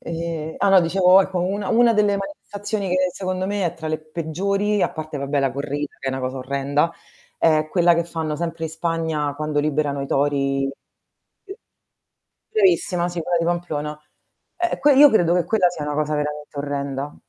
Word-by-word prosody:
ehm, 165 -1 -4
ah - - +2
no 195 -1 +7
dicevo 180 +2 +5
ecco, 190 -1 -3
una 195 +2 -2
una 235 0 +5
delle 210 -1 +3
manifestazioni 200 +1 -5
che 185 0 +1
secondo 185 0 -3
me 200 -2 -1
è 170 - -3
tra 165 -2 -7
le 155 0 -1
peggiori, 190 +6 -1
a - - +1
parte 155 -2 -6
vabbè 140 +1 -1
la 135 -2 0
corrida 145 +2 -4
che - - -8
è - - 0
una 130 0 -3
cosa 130 +1 -3
orrenda, 140 +4 0 0.5
è 155 -1 +3
quella 175 -1 +4
che 170 0 0
fanno 160 -2 -3
sempre 165 0 -4
in 160 - -4
Spagna 160 -3 -2
quando 150 0 -1
liberano 145 -1 -1
i - - -4
tori 135 -1 0 1.8
bravissima 355 - +2
sì, 175 -1 -4
quella 175 +2 0
di 165 - 0
Pamplona. 155 -3 -2 0.6
Eh 350 0 -1
que 290 0 +5
io 290 +2 +9
credo 175 -6 +3
che 180 - +2
quella 195 -5 +3
sia 170 -4 -6
una 150 - -2
cosa 150 0 0
veramente 150 0 -4
orrenda. 140 0 -4
165 Hz, 185 wpm, -22 LUFS, 145-185 Hz, 1.8 s, io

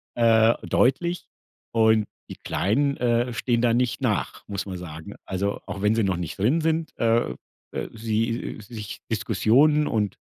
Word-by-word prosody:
äh, 115 -1 +5
deutlich 170 +7 +1 0.5
und 110 -2 +3 0.2
die - - -7
Kleinen, 140 +8 +1
äh, 120 0 +1
stehen 120 0 0
da 120 -2 +3
nicht 125 0 0
nach, - - -1
muss 100 -1 -4
man 95 -2 -5
sagen. 85 +2 -9
Also, 100 +2 -2
auch 95 0 -6
wenn 105 +2 +3
sie 115 - +2
noch 95 -3 0
nicht 85 -3 -5
drin 130 +12 +2
sind, 160 -1 0
äh, 115 - +2 0.4
äh, - - -4
sie 115 +1 -2
sich 105 -3 -8
Diskussionen 125 +8 +3
und 105 -3 -1
115 Hz, 155 wpm, -25 LUFS, 100-125 Hz, 0.5 s, äh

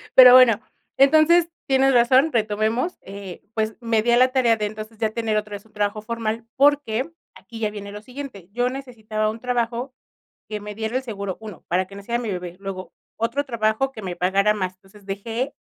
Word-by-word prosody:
Pero 250 -1 +10
bueno, 250 -4 +7 0.4
entonces 315 +5 +5 0.2
tienes 270 0 +4
razón, 255 +5 +5
retomemos, 220 - 0
eh, 195 -2 -9
pues 220 0 -1
me 230 -2 +1
di 235 +2 +1
a 240 - +5
la 255 +1 +5
tarea 245 -4 +3
de 210 - -1
entonces 215 +1 -7
ya 220 0 0
tener 220 -1 -1
otra 210 0 -3
vez 205 - -10
un 220 - -24
trabajo 210 0 -1
formal 225 0 -3
porque, 280 -1 +2 0.2
aquí 230 -2 -11
ya 215 -1 0
viene 205 -1 -8
lo 210 0 -8
siguiente, 245 -6 -9
yo 245 +3 0
necesitaba 225 -5 -3
un 220 +1 -5
trabajo 245 +1 -2 0.6
que 215 -1 -4
me 210 0 -7
diera 220 +3 -3
el 260 - 0
seguro, 200 -6 -5
1 215 -4 -10
para 185 +2 +1
que 195 - -14
naciera 235 +4 -3
mi 230 -3 -3
bebé, 180 -2 -5
luego 195 -1 -6 0.2
otro 235 +6 -1
trabajo 235 +1 0
que 220 - -9
me 180 -2 -5
pagara 195 +4 +2
más. 185 -3 -3
Entonces 195 +2 -20
dejé 225 +7 -3
220 Hz, 200 wpm, -23 LUFS, 205-250 Hz, 0.6 s, Pero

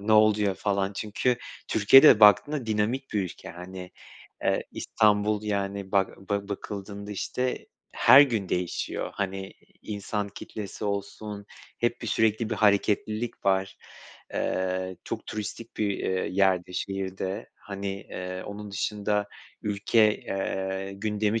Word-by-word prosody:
ne 105 +2 0
oluyor?" 105 -2 +4
falan 100 0 -1
çünkü 110 +4 0 0.3
Türkiye 110 +5 +7
de 130 -8 +8
baktığında 115 +6 +6
dinamik 110 +5 -1
bir 105 - +1
ülke, 90 - -7
hani, 90 +1 -9 0.5
eee, - - +1
İstanbul, 105 0 +2
yani, 100 -2 -3
bak 95 -1 +2
ba 100 0 -1
bakıldığında, 100 0 -6
işte, 125 +5 -2 0.3
her 130 +4 +8
gün 115 -9 +2
değişiyor, 90 -1 -2
hani, 95 -1 -3 0.3
insan 105 0 -3
kitlesi 105 +1 -7
olsun 100 0 -4 0.3
hep 120 0 0
bir - - -4
sürekli 110 0 +1
bir - - +1
hareketlilik 105 +2 +1
var. 95 0 +1 0.6
Eee, 95 0 -1
çok - - -5
turistik 110 +2 -6
bir, 105 -2 +1
eee, 95 0 -1
yer 95 -2 +3
de, - - -12
şehir 95 0 -3
de, 95 +4 -4
hani, 100 0 -6 0.2
eee, 90 0 -5
onun 105 0 -7
dışında 105 +1 -1 0.4
ülke, 105 +1 +3
eee, 95 0 -3
gündemi 105 +1 0
100 Hz, 130 wpm, -27 LUFS, 95-110 Hz, 0.6 s, de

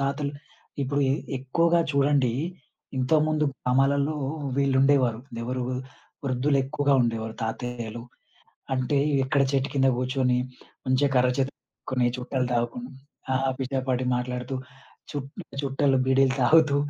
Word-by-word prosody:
తాతలు 140 +1 -1 0.5
ఇప్పుడు 140 +2 0
ఎ - - +2 0.2
ఎక్కువగా 165 +6 +2
చూడండి. 140 -3 +3 0.7
ఇంతకు 140 +4 +3
ముందు 155 -1 +1
గ్రామాలలో 140 +4 +2 0.4
వీళ్ళుండేవారు. 135 -3 +3 0.2
ఎవరు? 125 +1 -2 0.6
వృద్ధులెక్కువగా 140 +2 +1
ఉండేవారు. 115 -1 -2
తాతయ్యలు. 120 0 -4 0.7
అంటే 130 +2 +1 0.3
ఎక్కడ 140 +1 +2
చెట్టు 135 0 +1
కింద 135 -1 +3
గూర్చొని, 125 0 +1 0.5
మంచిగా 130 +2 +2
కర్ర 125 0 +4
చేత 135 0 +1
పట్టుకొని, 125 -2 -3
చుట్టలు 125 0 -2
తాగుకుని, 120 +2 -2 0.4
ఆ - - +2 0.2
పిచ్చపాటి 130 -1 -1
మాట్లాడుతూ, 125 +1 -3 0.6
చు - - -4 0.4
చుట్టలు, 135 0 +2
బీడీలు 130 0 +4
తాగుతూ 155 +1 +5
130 Hz, 110 wpm, -26 LUFS, 125-140 Hz, 0.7 s, తాగుతూ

